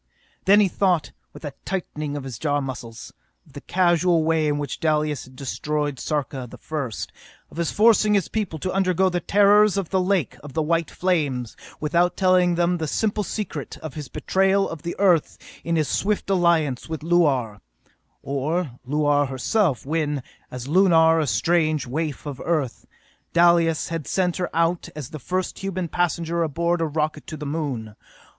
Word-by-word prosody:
Then 200 Hz, +2 st, +6 dB
he 205 Hz, -, +5 dB
thought, 180 Hz, -3 st, +1 dB, 0.2 s
with -, -, -11 dB
a 145 Hz, -, -5 dB
tightening 155 Hz, -6 st, -4 dB
of 140 Hz, -, -5 dB
his 130 Hz, -4 st, -7 dB
jaw 145 Hz, -2 st, +1 dB
muscles, 120 Hz, -4 st, -7 dB, 0.3 s
of 145 Hz, -, -22 dB
the 145 Hz, -, -8 dB
casual 175 Hz, -2 st, +2 dB
way 160 Hz, -1 st, +2 dB
in 145 Hz, -1 st, +1 dB
which 145 Hz, -2 st, -4 dB
Dalis 150 Hz, -3 st, 0 dB
had 130 Hz, 0 st, -17 dB
destroyed 145 Hz, +1 st, -3 dB
Sarka 140 Hz, -4 st, -3 dB
the -, -, -11 dB
First, 140 Hz, -8 st, -4 dB, 0.4 s
of -, -, -13 dB
his 170 Hz, -2 st, 0 dB
forcing 215 Hz, -1 st, +4 dB
his 195 Hz, -, +1 dB
people 205 Hz, -7 st, -3 dB
to 185 Hz, +5 st, -3 dB
undergo 190 Hz, 0 st, +2 dB
the 175 Hz, -1 st, -1 dB
terrors 205 Hz, +2 st, +4 dB
of 195 Hz, -4 st, -2 dB
the 190 Hz, -1 st, +2 dB
lake 180 Hz, -, 0 dB
of 145 Hz, -1 st, -10 dB
white 165 Hz, +1 st, +1 dB
flames 145 Hz, -10 st, -1 dB, 0.2 s
without 170 Hz, +4 st, +1 dB
telling 185 Hz, -2 st, +3 dB
them 175 Hz, +1 st, +1 dB
the 160 Hz, -, -2 dB
simple 210 Hz, +6 st, 0 dB
secret; 175 Hz, -, -5 dB
of 155 Hz, -4 st, -8 dB
his 150 Hz, -3 st, -6 dB
betrayal 195 Hz, +7 st, +1 dB
of 165 Hz, -3 st, -7 dB
the 170 Hz, -, -4 dB
Earth 180 Hz, -6 st, +3 dB, 0.3 s
in 170 Hz, +1 st, -1 dB
his 155 Hz, -3 st, +1 dB
swift 205 Hz, +9 st, -1 dB
alliance 165 Hz, -8 st, +2 dB
with 160 Hz, -1 st, -4 dB
Luar; 140 Hz, -, +1 dB, 0.6 s
or 145 Hz, +3 st, -1 dB, 0.2 s
Luar 145 Hz, 0 st, +2 dB
herself 135 Hz, -, 0 dB
when, 150 Hz, -2 st, -1 dB, 0.3 s
as 125 Hz, 0 st, -7 dB
Lunar, 165 Hz, -1 st, +5 dB
a 155 Hz, -, 0 dB
strange 155 Hz, +6 st, +1 dB
waif 150 Hz, +3 st, -3 dB
of 145 Hz, -3 st, -6 dB
Earth, 150 Hz, -8 st, -2 dB, 0.5 s
Dalis 170 Hz, -2 st, +4 dB
had 165 Hz, -3 st, -4 dB
sent 180 Hz, -2 st, 0 dB
her 180 Hz, -1 st, -2 dB
out 165 Hz, +1 st, 0 dB
as 150 Hz, -2 st, -7 dB
the 155 Hz, -, -7 dB
first 185 Hz, +7 st, -3 dB
human 185 Hz, -2 st, -3 dB
passenger 170 Hz, 0 st, -1 dB
aboard 170 Hz, +2 st, 0 dB
a 165 Hz, -, +1 dB
rocket 155 Hz, 0 st, -2 dB
to 155 Hz, -, -6 dB
the 150 Hz, -, -6 dB
Moon. 140 Hz, -8 st, -3 dB
160 Hz, 175 wpm, -23 LUFS, 145-180 Hz, 0.6 s, Then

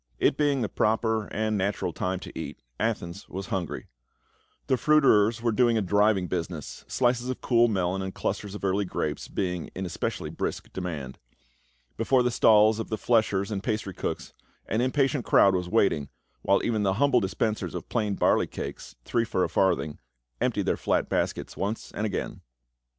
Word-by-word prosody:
It -, -, +3 dB
being 145 Hz, -3 st, +1 dB
the -, -, 0 dB
proper 110 Hz, 0 st, +1 dB
and 110 Hz, 0 st, -1 dB
natural 100 Hz, +1 st, -1 dB
time 95 Hz, +1 st, -2 dB
to -, -, -8 dB
cat, -, -, -6 dB, 0.2 s
Athens 100 Hz, -5 st, -3 dB
was 95 Hz, +1 st, -5 dB
hungry; 90 Hz, -4 st, -3 dB, 0.8 s
the 130 Hz, -, +2 dB
fruiterers 120 Hz, -6 st, +4 dB
were 120 Hz, -, +2 dB
doing 120 Hz, 0 st, +3 dB
a -, -, +2 dB
driving 100 Hz, 0 st, +3 dB
busi 85 Hz, 0 st, -2 dB
ness, 80 Hz, -5 st, -8 dB
slices 125 Hz, 0 st, +1 dB
of 130 Hz, -, -3 dB
cool 120 Hz, -1 st, +4 dB
melon 95 Hz, -3 st, 0 dB
and 95 Hz, 0 st, -3 dB
clusters 100 Hz, +1 st, -3 dB
of 105 Hz, -, -8 dB
early 100 Hz, +1 st, +1 dB
grapes 95 Hz, -, -3 dB
being 90 Hz, -3 st, -3 dB
in 95 Hz, -, -3 dB
especially 85 Hz, -, -3 dB
brisk -, -, -4 dB
demand; 80 Hz, -8 st, -5 dB, 0.8 s
before 125 Hz, +2 st, +3 dB
the 125 Hz, -, +1 dB
stalls 110 Hz, -1 st, +5 dB
of 115 Hz, -, -4 dB
the 110 Hz, -, -1 dB
fleshers 110 Hz, -3 st, +1 dB
and 100 Hz, -2 st, -2 dB
pastry 105 Hz, -4 st, -2 dB
cooks -, -, -4 dB, 0.3 s
an 110 Hz, -, 0 dB
impatient 135 Hz, +1 st, +1 dB
crowd 100 Hz, -2 st, +5 dB
was 90 Hz, -1 st, -1 dB
waiting, 95 Hz, -9 st, +2 dB, 0.3 s
while 100 Hz, -, +2 dB
even 110 Hz, -3 st, 0 dB
the 95 Hz, -2 st, +2 dB
humble 140 Hz, +2 st, +4 dB
dispensers 105 Hz, +2 st, -2 dB
of -, -, -5 dB
plain 105 Hz, -4 st, -1 dB
barley -, -, +3 dB
cakes -, -, -7 dB
— -, -, -42 dB
three 115 Hz, -, +1 dB
for 95 Hz, -5 st, 0 dB
a -, -, 0 dB
farthing, 85 Hz, -5 st, +1 dB, 0.4 s
emptied -, -, +1 dB
their -, -, +1 dB
flat -, -, 0 dB
baskets -, -, -1 dB
once 105 Hz, +4 st, -3 dB
and 110 Hz, -, -2 dB
again. 100 Hz, -, -4 dB
105 Hz, 180 wpm, -27 LUFS, 95-115 Hz, 0.8 s, stalls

